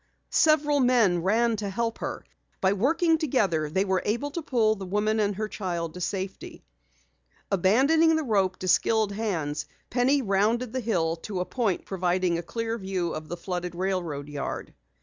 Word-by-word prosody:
Several 295 -2 +4
men 235 -9 +3
ran 225 +5 +2
to 205 -1 -3
help 230 +3 -2
her. - - -5 0.3
By 190 0 +3
working 320 - +2
together, 195 - +1
they 190 +6 +1
were 190 -1 +1
able 235 +7 -1
to 335 - -4
pull 230 -7 +2
the 195 -3 -7
woman 210 +3 +1
and 205 -1 +1
her 215 +2 -2
child 175 -6 -4
to 180 - -8
safety. 190 +1 -5 0.9
Abandoning 275 - +4
the 315 - 0
rope 195 -7 +1
to 185 - -5
skilled 220 +3 +3
hands, 175 -9 -2 0.2
Penny 260 +3 +2
rounded 220 +4 +1
the 260 - -1
hill 170 -8 0
to 190 +3 -5
a 180 - -1
point 220 -7 -1
providing 180 -2 0
a - - -3
clear 230 +6 -3
view 190 -3 -2
of 155 0 -6
the 175 - -5
flooded 180 0 -4
railroad 175 -6 -2
yard. 145 -1 -5
200 Hz, 170 wpm, -26 LUFS, 180-235 Hz, 0.9 s, Several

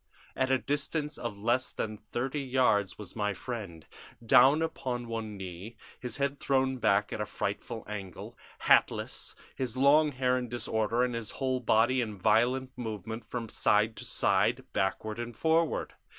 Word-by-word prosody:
At 130 0 +1
a 130 - +4
distance 145 +4 -2
of 115 -4 -4
less 120 +5 +1
than 110 -1 -4
thirty 130 +7 -3
yards 125 -7 +2
was 105 -4 -8
my 105 -2 -1
friend, 100 -7 -6 0.4
down 135 +7 +6
upon 125 -6 -3
one 110 -2 -4
knee, 95 +4 -8 0.2
his 125 - -4
head 140 0 -1
thrown 130 -1 +1
back 105 -3 +2
at - - -3
a - - -1
frightful 105 +3 -4
angle, 100 -4 -7 0.3
hatless, - - +2 0.2
his 130 -2 -3
long 145 +3 +5
hair 125 0 +1
in 125 -1 -5
disorder 115 0 0
and 125 -1 0
his 115 -2 -4
whole 130 -2 0
body 120 +2 +3
in 110 -3 -4
violent 120 +6 +2
movement 110 -2 -5
from 120 -2 -4
side 105 +1 +2
to - - -6
side, - - +2
backward 105 +3 -1
and 120 -1 -6
forward. 160 0 +1
120 Hz, 160 wpm, -30 LUFS, 105-130 Hz, 0.4 s, down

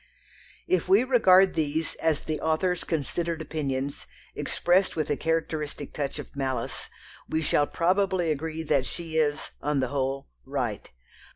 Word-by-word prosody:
If 370 +1 +1
we 380 -8 +6
regard 195 -7 +5
these 155 0 -1
as 160 -3 +1
the 155 -1 -3
author's 175 +3 +1
considered 165 +2 -2
opinions, 140 -3 -3 0.3
expressed 185 +2 +2
with 155 -1 -1
a - - +3
characteristic 155 -2 -2
touch 145 -1 -3
of 145 - -8
malice, 130 -4 -2 0.4
we 160 0 0
shall 145 0 +3
probably 185 -1 +1
agree 160 +2 -3
that 140 -4 +1
she 165 -2 -4
is, 150 -2 +1
on 145 -1 +1
the 130 -2 0
whole, 135 0 -2 0.2
right. 125 -7 -3
155 Hz, 145 wpm, -27 LUFS, 140-170 Hz, 0.4 s, we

